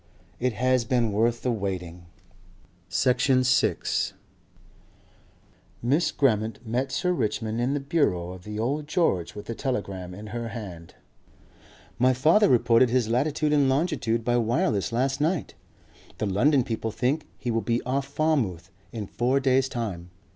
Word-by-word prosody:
IT 125 Hz, -1 st, 0 dB
HAS 125 Hz, +2 st, +2 dB
BEEN 120 Hz, -2 st, +1 dB
WORTH 115 Hz, +3 st, +1 dB
THE 125 Hz, -, +1 dB
WAITING...." 90 Hz, -5 st, -4 dB, 0.8 s
Section 130 Hz, +1 st, +2 dB
6 130 Hz, +1 st, +1 dB, 1.7 s
Miss 145 Hz, +8 st, +2 dB
Grammont 110 Hz, -5 st, +1 dB
met 125 Hz, +4 st, -1 dB
Sir 180 Hz, -, 0 dB
Richmond 110 Hz, -4 st, -2 dB
in 130 Hz, +4 st, 0 dB
the -, -, 0 dB
bureau 135 Hz, -, 0 dB
of 90 Hz, -1 st, -10 dB
the 105 Hz, +1 st, -6 dB
Old 140 Hz, +7 st, -1 dB
George 120 Hz, -, 0 dB
with 105 Hz, -, -8 dB
a 115 Hz, -, -3 dB
telegram 100 Hz, -8 st, -4 dB
in 105 Hz, +3 st, -9 dB
her 120 Hz, -1 st, -3 dB
hand. 95 Hz, -8 st, -8 dB, 1.0 s
"My 130 Hz, +1 st, +4 dB
father 160 Hz, -, +4 dB
reported 120 Hz, 0 st, +4 dB
his 120 Hz, -2 st, +1 dB
latitude 150 Hz, +5 st, +1 dB
and 140 Hz, -2 st, +4 dB
longitude 130 Hz, -6 st, 0 dB
by 120 Hz, 0 st, +2 dB
wireless 115 Hz, -3 st, 0 dB
last 135 Hz, +4 st, 0 dB
night. 165 Hz, +1 st, 0 dB, 0.6 s
The -, -, -1 dB
London 125 Hz, +8 st, +3 dB
people 115 Hz, -1 st, -3 dB
think 135 Hz, +7 st, -1 dB
he 120 Hz, -, -3 dB
will 115 Hz, 0 st, 0 dB
be 115 Hz, +3 st, 0 dB
off 135 Hz, +2 st, -1 dB
Falmouth 130 Hz, -, -1 dB, 0.2 s
in 110 Hz, -3 st, -5 dB
four 125 Hz, +6 st, 0 dB
days' 135 Hz, 0 st, +2 dB
time. 100 Hz, -9 st, -4 dB
120 Hz, 145 wpm, -26 LUFS, 110-135 Hz, 1.7 s, My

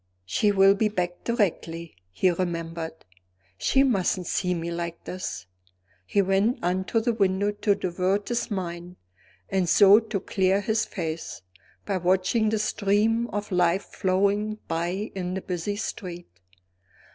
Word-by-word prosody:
"She 205 Hz, -, +2 dB
will 195 Hz, 0 st, +6 dB
be 210 Hz, +2 st, +1 dB
back 175 Hz, -3 st, -3 dB
directly," 170 Hz, -, -1 dB
he 180 Hz, -, +2 dB
remembered; 165 Hz, -2 st, -4 dB, 0.5 s
"she 270 Hz, -, +3 dB
mustn't 190 Hz, -7 st, +1 dB
see 180 Hz, +1 st, 0 dB
me 170 Hz, 0 st, -4 dB
like 170 Hz, 0 st, -5 dB
this!" 185 Hz, -, -5 dB, 0.6 s
He 200 Hz, -, +2 dB
went 195 Hz, +5 st, +2 dB
on 185 Hz, +2 st, 0 dB
to 225 Hz, +4 st, +1 dB
the 235 Hz, +1 st, +1 dB
window 200 Hz, -1 st, +1 dB
to 205 Hz, 0 st, +1 dB
divert 185 Hz, +3 st, -1 dB
his 240 Hz, -1 st, -1 dB
mind 175 Hz, -3 st, -5 dB, 0.6 s
(and 185 Hz, -3 st, +1 dB
so 200 Hz, +3 st, +7 dB
to 220 Hz, -3 st, -3 dB
clear 190 Hz, 0 st, +1 dB
his 220 Hz, +2 st, 0 dB
face) 160 Hz, -, -5 dB, 0.4 s
by 200 Hz, -2 st, -1 dB
watching 185 Hz, +5 st, +2 dB
the 220 Hz, -, 0 dB
stream 215 Hz, +2 st, +1 dB
of 205 Hz, -2 st, -5 dB
life 180 Hz, +1 st, +2 dB
flowing 200 Hz, +3 st, 0 dB
by 175 Hz, +6 st, -2 dB
in 185 Hz, -1 st, -3 dB
the 190 Hz, -, -3 dB
busy 180 Hz, +3 st, -3 dB
street. 180 Hz, -4 st, -6 dB
190 Hz, 145 wpm, -26 LUFS, 175-205 Hz, 0.6 s, so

